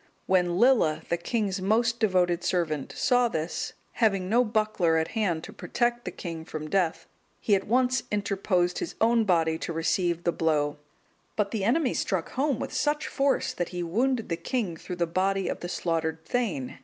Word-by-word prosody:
When 180 -2 +2
Lilla, 230 -10 +4
the 170 - +1
king's 195 +1 -1
most 230 +4 +2
devoted 180 -5 +2
servant, 160 -6 -1
saw 245 -1 +3
this, 160 -6 -3 0.2
having 195 -5 +1
no 235 +5 +4
buckler 215 -7 +1
at 160 0 0
hand 185 -8 -1
to - - -9
protect 240 0 -1
the - - -3
king 165 -3 -6
from 155 -1 -7
death, 180 -4 +1 0.3
he 210 - +1
at 195 -1 +2
once 255 +3 +2
interposed 195 -3 0
his 355 - -5
own 230 0 +3
body 165 -4 +2
to - - -4
receive 170 +1 0
the 170 - +2
blow; 150 -3 0 0.6
but 210 -2 0
the 215 -4 -2
enemy 250 +5 +2
struck 185 -4 -1
home 275 -1 0
with - - -5
such 295 0 0
force, 275 0 +1
that 175 - -3
he 180 -1 -4
wounded 230 +7 0
the 165 - -1
king 220 -8 -2
through 180 +3 -7
the 175 -1 +1
body 190 +3 0
of - - -3
the 175 - -6
slaughtered 160 -2 -2
thegn. 190 - -2
185 Hz, 180 wpm, -27 LUFS, 165-230 Hz, 0.6 s, Lilla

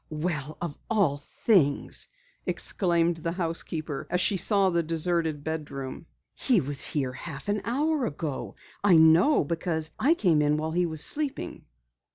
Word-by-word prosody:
"Well, 155 -2 -4
of 170 -4 -5
all 195 -11 +2
things!" 145 0 0 0.4
exclaimed 170 -3 +1
the 165 +1 -3
housekeeper 165 -4 -4
as 180 - 0
she 195 - +2
saw 195 +1 +3
the 170 -1 +1
deserted 165 -2 0
bedroom. 150 -2 -6 0.3
"He 250 -6 +2
was 140 -2 -2
here 135 -4 -1
a 130 - -11
half 135 0 -8 0.2
hour 285 +3 0
ago. 145 -2 -5 0.3
I 200 -4 +5
know 160 - +5
because 160 0 -2
I 310 +6 +3
came 170 - +2
in 150 0 +2
while 155 +1 -3
he 175 +1 +1
was 160 -1 +1
sleeping." 295 -2 +2
165 Hz, 150 wpm, -27 LUFS, 150-185 Hz, 0.4 s, I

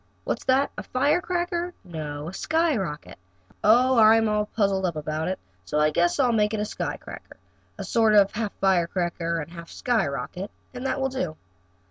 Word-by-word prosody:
What's - - -3
that 270 +2 +3
a - - -3
firecracker 345 +5 0
no? 155 -4 -6
A 175 - -6
skyrocket? 245 - -1 0.4
Oh, 245 +3 +5
I'm 220 0 +6
all 210 0 0
puzzled 200 -3 0
up 175 -3 0
about 155 +1 -3
it, 185 - -1 0.3
so 125 +12 -1
I 150 0 +3
guess 175 - +1
I'll 255 -3 +4
make 215 -1 +2
it - - -3
a 210 - 0
sky 215 - -4
cracker, - - -11 0.4
a - - -5
sort 225 -2 +3
of 200 -1 +6
half 215 -1 -3
firecracker 175 -2 0
and 160 +1 -7
half 170 -1 -10
skyrocket, 185 - -2 0.2
and 255 +1 -4
that 270 - -1
will 265 0 0
do. 180 -12 -3
210 Hz, 175 wpm, -25 LUFS, 170-250 Hz, 0.4 s, I'm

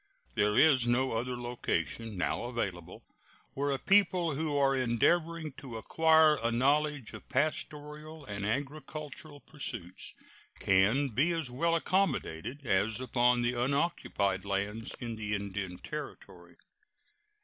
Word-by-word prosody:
There 105 - +2
is 135 -6 +5
no 130 +2 +2
other 120 +2 -2
location 115 -3 -3
now 90 - -1
available 100 -8 -4 0.5
where 140 +1 -1
a 135 - +1
people 180 -1 +3
who 150 0 -1
are 135 -1 +3
endeavoring 155 +6 +1
to 125 -5 -7
acquire 160 +4 +4
a 115 - 0
knowledge 140 +1 +1
of - - -11
pastoral 150 0 -2
and 100 -3 -5
agricultural 145 +4 -5
pursuits 115 - -6 0.4
can 105 +9 +3
be 135 +9 +2
as 160 -7 -3
well 165 +6 +1
accommodated 145 - -1
as 105 +2 +1
upon 125 -1 +2
the 120 +1 +1
unoccupied 125 - 0
lands 100 +3 -3
in 115 -2 -6
the 105 -1 -2
Indian 100 -2 -4
Territory. 150 +8 -8
130 Hz, 125 wpm, -31 LUFS, 110-150 Hz, 0.5 s, is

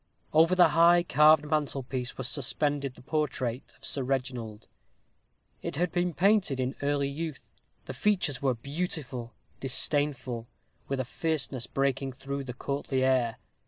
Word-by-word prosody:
Over 165 +3 +5
the 180 -3 +6
high 170 +3 +5
carved 150 0 +5
mantelpiece 135 -4 -2
was 130 - -3
suspended 140 0 -1
the - - -15
portrait 130 -4 -2
of - - -11
Sir 140 - 0
Reginald. 125 -5 -3 1.0
It - - -4
had 175 +2 0
been 175 -2 0
painted 195 -8 +3
in 130 +1 -1
early 140 0 +1
youth; 150 +1 -5 0.4
the - - -6
features 185 -10 0
were 135 -3 +2
beautiful, 140 -3 -4 0.2
disdainful, 135 -3 +1 0.4
with 135 -1 -2
a 130 - -1
fierceness 140 -3 -2
breaking 135 -1 -1
through 140 +1 -5
the 125 - -5
courtly 135 0 -2
air. 130 -3 +2
140 Hz, 140 wpm, -29 LUFS, 130-155 Hz, 1.0 s, the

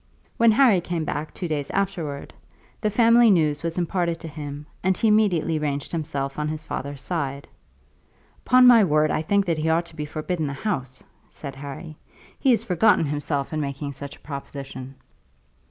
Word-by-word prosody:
When 230 0 +5
Harry 225 -7 +5
came 170 -2 -3
back 150 +1 -3
two 180 - -5
days 150 -3 -2
afterwards, 175 -8 -3 0.5
the 215 - +1
family 230 +2 +5
news 155 -6 +2
was 165 0 -3
imparted 175 -1 -1
to 165 - -6
him, 145 -1 -7 0.2
and 190 0 +1
he 225 - +2
immediately 185 -7 +2
ranged 145 -2 -2
himself 140 -4 -3
on 150 - -1
his 155 0 -4
father's 140 -2 -5
side. 140 -5 -3 1.0
"Upon 255 0 +7
my 240 -3 +8
word 155 -3 +2
I - - 0
think 200 +5 +1
that 165 -3 0
he 160 +1 0
ought 165 +2 +2
to 165 - -11
be 150 -1 -4
forbidden 155 +1 -3
the 140 - -3
house," 135 - -4 0.3
said 140 -2 -8
Harry. 145 +3 -8 0.4
"He 270 - +2
has 230 -3 +4
forgotten 200 -3 +3
himself 145 0 -2
in 155 - -1
making 140 0 -4
such 140 +1 -8
a - - -22
proposition." 135 -2 -8
155 Hz, 180 wpm, -24 LUFS, 145-185 Hz, 1.0 s, my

